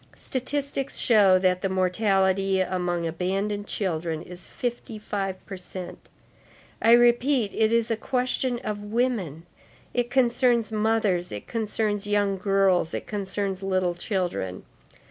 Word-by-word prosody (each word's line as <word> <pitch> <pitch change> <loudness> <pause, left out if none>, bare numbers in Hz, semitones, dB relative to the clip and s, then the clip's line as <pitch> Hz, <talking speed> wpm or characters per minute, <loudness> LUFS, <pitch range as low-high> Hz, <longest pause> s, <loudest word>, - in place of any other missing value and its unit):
Statistics 275 +1 -2
show 205 -5 +5
that 185 -1 +1
the 195 - 0
mortality 190 0 +2
among 180 -2 -1
abandoned 195 +5 -2
children 165 -4 -2
is 180 0 -8
fifty 240 -2 -4
five 195 -3 -4
per 195 - -7
cent. 180 0 -9 0.7
I 230 - +6
repeat, 240 -1 +4
it 220 0 +2
is 230 0 +2
a - - +2
question 250 +1 -1
of 205 -1 -4
women, 205 - -1 0.5
it 245 -1 0
concerns 240 -2 +2
mothers, 215 -5 +1
it 105 - -6
concerns 210 -2 -2
young 205 -2 +1
girls, 195 -3 +2
it - - -4
concerns 195 -1 -3
little 185 -2 0
children. 175 - -3
200 Hz, 125 wpm, -25 LUFS, 185-230 Hz, 0.7 s, I